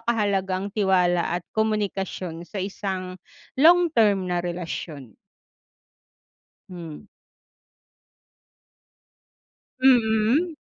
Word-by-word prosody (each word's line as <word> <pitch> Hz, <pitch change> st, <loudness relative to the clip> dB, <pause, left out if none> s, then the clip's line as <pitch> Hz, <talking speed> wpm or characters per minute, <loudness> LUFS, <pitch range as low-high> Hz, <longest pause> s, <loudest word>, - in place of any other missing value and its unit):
kahalaga 200 Hz, -5 st, 0 dB
ang 200 Hz, +1 st, -5 dB
tiwala 180 Hz, -4 st, +2 dB
at 175 Hz, -, -7 dB
komunikasyon 195 Hz, -5 st, -3 dB
sa 210 Hz, -, -9 dB
isang 190 Hz, -1 st, -5 dB, 0.4 s
long-term 300 Hz, -, +4 dB
na 175 Hz, -, 0 dB
relasyon? 170 Hz, -, -6 dB, 1.5 s
Hmm. 170 Hz, -4 st, -9 dB, 2.8 s
Mm. 245 Hz, +6 st, +3 dB
195 Hz, 65 wpm, -24 LUFS, 180-220 Hz, 2.8 s, long-term